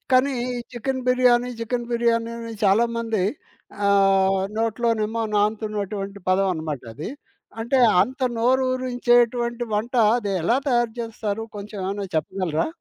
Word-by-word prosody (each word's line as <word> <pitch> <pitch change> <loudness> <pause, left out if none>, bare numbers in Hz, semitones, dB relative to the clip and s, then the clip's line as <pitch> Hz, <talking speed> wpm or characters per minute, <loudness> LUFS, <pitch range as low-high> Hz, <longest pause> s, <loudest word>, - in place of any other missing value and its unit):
కానీ 255 +2 +4 0.2
ఈ - - -3 0.2
chicken 260 +2 -3
biryani, 250 -1 +3
chicken 240 +1 -2
biryani 230 -1 +1
అని 230 -1 -6
చాలామంది 230 +1 +2 0.7
ఆహ్, 195 -1 +4 0.2
నోట్లోనేమో 225 -1 0
నానుతున్నటువంటి 205 -1 -2
పదమనమాటది. 160 - -1 0.5
అంటే 245 +4 +1 0.2
అంత 260 +2 -6 0.2
నోరురించేటువంటి 245 -1 +2
వంట 230 +4 -2 0.2
అది 205 -4 -3
ఎలా 235 +9 +2
తయారు 240 -2 +2
చేస్తారు 225 -2 -4
కొంచెం 205 0 -7
ఏమన్నా 200 +1 -3
చెప్పగలరా? 165 0 -1
230 Hz, 110 wpm, -23 LUFS, 200-240 Hz, 0.7 s, కానీ